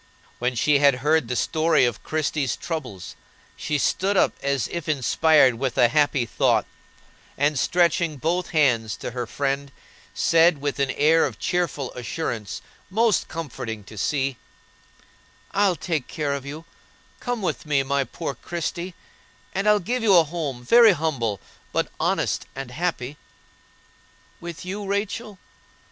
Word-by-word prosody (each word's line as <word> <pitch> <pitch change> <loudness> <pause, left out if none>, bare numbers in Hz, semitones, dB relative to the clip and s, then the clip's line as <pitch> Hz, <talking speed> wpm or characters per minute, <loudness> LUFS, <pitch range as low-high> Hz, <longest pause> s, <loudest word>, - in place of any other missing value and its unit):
When 125 +1 0
she 145 +4 +3
had 140 -2 +5
heard 155 -4 +3
the 125 - -2
story 160 0 +2
of 120 -2 -2
Christie's 150 -3 -1
troubles, 125 - -6 0.4
she 150 - -2
stood 195 +7 +1
up - - +3
as 140 -4 0
if 170 -3 -5
inspired 150 -1 +4
with 135 -2 -2
a 120 -2 +5
happy 145 -2 +2
thought, 115 - +2 0.7
and 145 0 +2
stretching 170 -2 +2
both 170 +6 -1
hands 125 -9 +2
to - - -5
her 120 -1 -4
friend, 140 +1 -2 0.4
said, 165 0 +4
with 145 0 -3
an 140 -1 +1
air 155 +5 +4
of 115 -6 -9
cheerful 145 0 -1
assurance 120 -4 -4 0.3
most 220 +1 +2
comforting 120 -9 -6
to 105 - -13
see: 135 +4 -1 1.1
"I'll 195 -2 +2
take 160 -6 -2
care 145 -2 -2
of 140 -1 -5
you; 155 +3 -7 0.5
come 245 -4 -3
with 175 - -2
me, 140 -2 +2
my 140 +1 +1
poor 140 +4 -5
Christie, 175 +3 -5 0.6
and 195 +2 +1
I'll 210 0 +5
give 240 +7 -2
you 210 -4 +5
a 170 - +7
home, 150 -6 -4
very 230 - +7
humble, 135 - -1 0.3
but - - -1
honest - - 0
and 135 -2 -6
happy." 150 -3 -3 1.2
"With 170 0 -8
you, 200 +3 -4
Rachel?" 200 +2 -3
150 Hz, 145 wpm, -24 LUFS, 130-175 Hz, 1.2 s, a